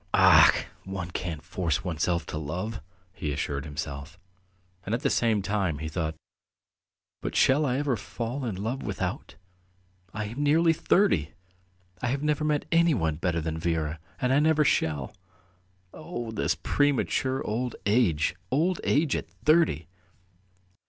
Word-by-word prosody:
"Ach! - - +7 0.2
one 95 -2 -5
can't 80 -3 -4
force 85 -2 -1
oneself 85 -1 -1
to 75 - -4
love," 90 +8 -4 0.3
he 75 - -3
assured 70 0 -3
himself, 75 +1 -6 0.7
and 105 +5 -1
at 120 - -4
the - - +2
same 110 -4 +2
time 95 -5 0
he 80 +1 -5
thought, 80 0 -2 1.1
"But - - -4
shall 145 +3 +4
I 125 0 0
ever 140 -3 +1
fall 120 +4 -5
in 115 -6 -2
love 115 +8 -3
without? - - -4 0.8
I 105 +2 -4
am 115 +7 -5
nearly 160 +3 +4
thirty! 165 - +2 0.7
I 125 - 0
have 135 +4 -1
never 150 0 +1
met 150 -1 +1
anyone 145 - +3
better 85 0 -1
than 80 0 -3
Vera 80 -2 -1 0.2
and 125 +1 +1
I 140 - +5
never 155 0 +4
shall.... 75 - 0 0.8
Oh, 120 -1 -6
this 110 - 0
premature 135 -1 +1
old 120 +2 -2
age! 100 -9 +2
Old 170 +6 +1
age 145 0 +2
at - - -4
thirty!" 90 - +2
105 Hz, 145 wpm, -27 LUFS, -, 1.1 s, Ach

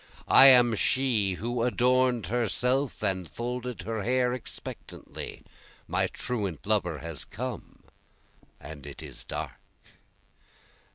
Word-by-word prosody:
I 135 - +11
am 125 -3 +7
she 110 -4 +1
who 120 +5 -3
adorn'd 125 -1 +2
herself 125 - 0
and 95 -4 -1
folded 120 - -4
her 110 +2 -3
hair 125 +2 +1
expectantly, 125 - -8 0.4
My - - +1
truant 100 - -4
lover 100 -6 0
has 80 -1 -3
come, 125 0 -7 0.8
and 75 -1 -10
it 70 - -7
is - - -9
dark. - - -6
120 Hz, 110 wpm, -28 LUFS, 95-125 Hz, 0.8 s, I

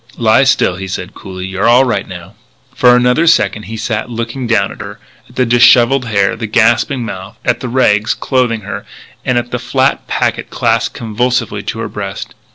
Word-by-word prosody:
"Lie 115 +3 +3
still," 95 -8 +2
he 95 +1 -6
said 95 +1 -6
coolly; 95 -2 -8
"you're 95 +3 -1
all 120 +3 +6
right 125 -3 -1
now." - - -10 0.4
For 125 -1 +5
another 125 +7 +2
second 105 -8 +2
he 110 - -5
sat 110 +1 -3
looking 115 +2 -4
down 115 -4 +1
at - - -10
her, - - -8 0.3
at - - -19
the 130 - +2
dishevelled 120 +2 +4
hair, 105 0 +1
the 115 -1 -5
gasping 115 +4 +2
mouth, 95 -1 -8
at 125 - +1
the 125 - -5
rags 110 -4 +2
clothing 125 -4 0
her, 100 - -6 0.4
and 125 - 0
at 120 0 -2
the - - -2
flat - - 0
packet - - -1
clasped - - 0
convulsively 115 -1 -1
to 110 - -5
her 115 - -3
breast. 100 -1 -6
115 Hz, 190 wpm, -14 LUFS, 105-125 Hz, 0.4 s, all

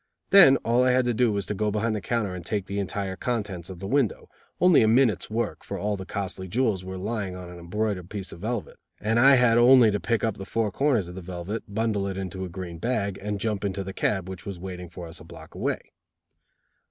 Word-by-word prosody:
Then 170 -9 +9
all 120 +2 +3
I 130 - +4
had 125 0 +3
to 120 - +1
do 120 0 +2
was 100 -1 -2
to - - -3
go 105 +1 0
behind 110 +2 0
the 105 - -3
counter 115 -4 -1
and 90 -1 -6
take 100 +1 -2
the 100 +1 -3
entire 100 -1 -3
contents 100 -7 -3
of 95 - -7
the 95 - -7
window 135 -1 0 0.3
only 180 -3 +6
a 110 - +4
minute's 115 -3 +3
work, 115 +2 -2
for - - -5
all 105 0 -1
the 95 -1 -8
costly 95 -2 -4
jewels 110 -2 0
were 95 0 -6
lying 100 -1 -3
on 90 -1 -8
an 90 - -10
embroidered 90 +1 -2
piece 100 -3 -5
of - - -10
velvet, 110 +2 -4 0.2
and 110 +2 +1
I 135 +3 +7
had 120 -2 +4
only 120 -2 +7
to 105 - -1
pick 115 +1 0
up 110 -3 0
the 95 - -6
four 110 -2 0
corners 120 -5 +1
of 90 - -8
the 95 - -7
velvet, 90 +5 -5
bundle 105 -2 0
it 95 -1 -4
into 95 0 -4
a 95 - -5
green 85 -2 -7
bag, 100 -3 -1
and 105 0 -3
jump 105 -2 -1
into 100 -1 -2
the 95 0 -6
cab 95 -1 -1
which 95 -1 -7
was 100 -2 -6
waiting 90 -1 -7
for 90 0 -8
us 80 - -9
a - - -12
block - - -13
away. - - -3
100 Hz, 245 wpm, -26 LUFS, 95-115 Hz, 0.3 s, Then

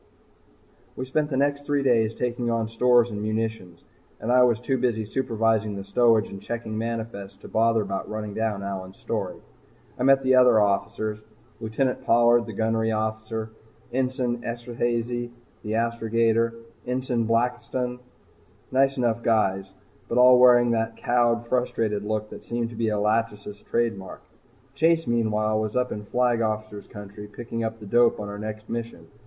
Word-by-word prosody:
We 130 - -4
spent 150 +3 0
the 130 - -1
next 145 +1 +1
three 145 -1 0
days 115 -4 +2
taking 120 -1 -2
on 115 -1 0
stores 120 +1 +3
and 105 -1 -4
munitions, 110 -5 -3 0.4
and 115 - -2
I 125 0 +6
was 120 -3 +4
too 130 +1 -1
busy 115 -3 0
supervising 110 -3 0
the 100 - -5
stowage 110 +2 +3
and 95 - -9
checking 115 -2 -5
manifests 110 -3 -4
to - - -10
bother 115 0 +2
about 95 -1 -4
running 105 -1 -5
down 110 -3 -2
Allyn's 95 -1 -6
story. 105 -5 -3 0.6
I - - 0
met 135 0 +5
the 130 0 +3
other 125 -3 +6
officers 105 +1 0 0.4
Lt. 115 +3 -1
Pollard 120 0 +4
the 110 - -6
gunnery 110 +1 0
officer, 110 0 -3 0.4
Ensign 125 -2 -1
Esterhazy 120 0 -2 0.3
the 105 -1 -4
astrogator, 115 0 +1 0.3
and 125 - -1
Ensign 120 -3 -1
Blakiston. 125 +1 -1 0.7
Nice 135 +1 +2
enough 120 -2 0
guys, 95 -4 +1 0.4
but 115 - -1
all 125 0 +7
wearing 120 -1 +6
that 115 0 -1
cowed, 120 -1 +1
frustrated 115 -4 -1
look 105 0 -3
that - - -10
seemed 120 0 -3
to - - -9
be 115 0 0
a 105 - 0
"Lachesis" 105 -1 -1
trademark. 115 -5 -2 0.5
Chase, 165 +3 +2
meanwhile, 110 -2 +1
was 110 -1 -3
up 125 0 0
in 105 0 -5
Flag 120 +1 +1
Officer's 110 -2 -3
Country 105 0 -10
picking 115 +2 -5
up 110 0 -3
the 105 - -10
dope 120 +3 +3
on 105 -1 -5
our 100 0 -6
next 110 0 -6
mission. 115 -8 -5
115 Hz, 160 wpm, -25 LUFS, 110-120 Hz, 0.7 s, all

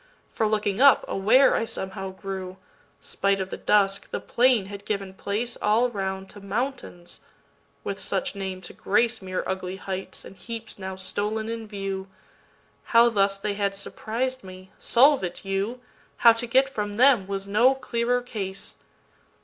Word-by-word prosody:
For, 220 - 0
looking 210 0 0
up, 280 -2 +7
aware 230 +8 +4
I - - +1
somehow 195 -3 -5
grew, 190 -1 -6 0.4
Spite 200 0 0
of 190 0 -4
the - - -4
dusk, 200 -1 +2
the - - -3
plain 245 -4 +3
had 200 +1 -8
given 200 -2 -3
placeAll 225 +3 0
round 190 -1 -3
to 205 - -12
mountains—with 200 -4 -6
such - - -2
name 190 -2 -5
to 175 - -9
graceMere 205 -3 0
ugly 185 0 -3
heights 190 0 -6
and - - -11
heaps 225 0 -7
now 190 0 -5
stolen 210 +4 -2
in 230 -1 -5
view. 195 -2 -4 0.8
How 235 0 +6
thus 200 -3 +2
they 205 +1 -2
had 200 -1 -1
surpris'd 240 +5 -3
me,—solve 195 +8 +2
it, 180 +2 -5
you! 200 +6 -2 0.4
How 230 -1 +7
to 230 +1 -4
get 265 +3 +4
from 210 -6 -3
them 240 -3 +5
was 195 0 -4
no 235 +7 +4
clearer 245 -1 0
case. 195 -5 -6
205 Hz, 150 wpm, -25 LUFS, 190-235 Hz, 0.8 s, up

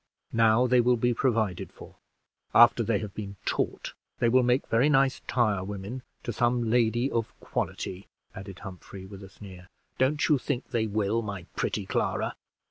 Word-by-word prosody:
Now 115 +1 +4
they 125 0 +4
will 125 +1 +3
be 120 +1 +1
provided 110 -7 0
for. - - -14 0.6
After 120 0 +7
they 115 -1 +1
have 105 -2 -6
been 100 -2 -6
taught, - - -2 0.2
they 120 - +2
will 130 +2 +5
make 125 +1 +2
very 125 +6 +3
nice 135 -2 +3
tirewomen 105 0 -1 0.2
to 120 - -3
some 120 0 +1
lady 120 +2 +2
of 115 -2 -3
quality," 95 +2 -4 0.3
added 95 -1 -9
Humphrey, 95 +1 -10
with 100 0 -11
a 95 - -11
sneer. 95 -2 -12 0.3
"Don't 145 +3 +2
you 150 -3 +3
think 130 -1 -3
they 115 -2 0
will, 105 +2 0
my 100 -5 -5
pretty - - -2
Clara?" - - -1
115 Hz, 165 wpm, -27 LUFS, 100-125 Hz, 0.6 s, After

